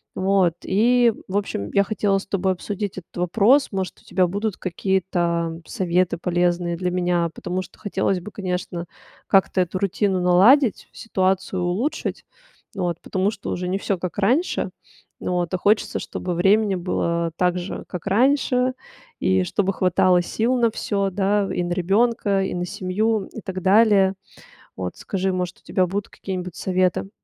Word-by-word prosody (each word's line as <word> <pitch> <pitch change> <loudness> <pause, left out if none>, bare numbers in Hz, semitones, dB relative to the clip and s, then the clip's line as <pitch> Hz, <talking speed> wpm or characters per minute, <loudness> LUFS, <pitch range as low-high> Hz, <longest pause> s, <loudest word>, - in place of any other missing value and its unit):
Вот, 190 -3 +2
и, 235 +3 +3 0.2
в 200 - 0
общем, 105 - -3
я 200 - +4
хотела 205 -1 +1
с 195 - -6
тобой 190 -1 0
обсудить 200 +2 -5
этот 185 - -11
вопрос. 215 +10 +3
Может, 190 -2 -4
у - - -26
тебя 185 -2 +1
будут 205 +2 -2
какие-то 170 -3 -1
советы 180 -1 0
полезные 175 0 0
для 180 0 -1
меня, 175 -2 +1
потому 180 +1 -3
что - - -13
хотелось 195 -2 0
бы, 180 +4 -9
конечно, 180 -3 -4 0.4
как-то 190 -1 +3
эту 180 +1 -2
рутину 200 -1 0
наладить, 205 +8 +4
ситуацию 190 -3 -1
улучшить. 220 - -2 0.5
Вот, 175 -3 -2
потому 190 +2 0
что 200 - -6
уже 180 0 -3
не 190 - 0
всё 195 -1 -1
как 180 +2 -5
раньше. 250 - +1 0.5
Вот, 175 -1 -1
а 185 - +2
хочется, 210 +4 +1
чтобы 180 - -4
времени 200 +3 +3
было 170 -2 -1
так 180 0 +2
же, 175 - -6
как 180 +1 -7
раньше, 255 +3 +2 0.5
и 95 0 +2
чтобы 195 - 0
хватало 180 -1 +3
сил 235 +7 0
на 230 -2 +3
всё, 200 -2 -1
да, 200 +1 +1
и 175 - -1
на 175 - -3
ребенка, 200 +2 +1
и 190 - -3
на 175 0 -2
семью, 200 +4 -1
и - - -6
так 185 -1 -5
далее. 195 0 +4 0.6
Вот, - - -4
скажи, 190 -3 -2
может, 180 0 -3
у - - -33
тебя 185 -2 +1
будут 200 +2 -3
какие-нибудь 180 -2 -6
советы? 185 0 0
190 Hz, 160 wpm, -22 LUFS, 180-205 Hz, 0.6 s, я